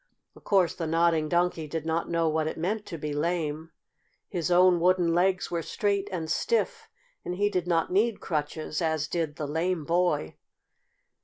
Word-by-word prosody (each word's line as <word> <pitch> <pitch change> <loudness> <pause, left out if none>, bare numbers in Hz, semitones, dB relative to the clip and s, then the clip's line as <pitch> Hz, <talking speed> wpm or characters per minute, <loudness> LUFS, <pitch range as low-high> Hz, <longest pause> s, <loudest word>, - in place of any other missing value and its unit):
Of - - -17
course 190 -4 +3
the 165 - -4
Nodding 165 -1 +2
Donkey 175 -2 +1
did 160 +1 -4
not 165 +1 -1
know 165 -1 +1
what 155 0 0
it - - -4
meant 205 +6 -2
to 165 - -6
be 150 -1 -4
lame. 160 0 -2 0.6
His 175 -3 -2
own 180 0 +5
wooden 175 -1 +3
legs 180 +1 +1
were 170 -1 -1
straight 200 +3 -1
and 165 -4 -3
stiff, 465 - -1 0.3
and 180 - -4
he 205 +2 +1
did 180 -3 -1
not 165 -1 +1
need 210 +3 +2
crutches, 155 0 -3
as 160 -3 0
did 160 -4 -2
the 150 - -4
lame 160 +2 -1
boy. 170 - 0
170 Hz, 175 wpm, -27 LUFS, 160-180 Hz, 0.6 s, own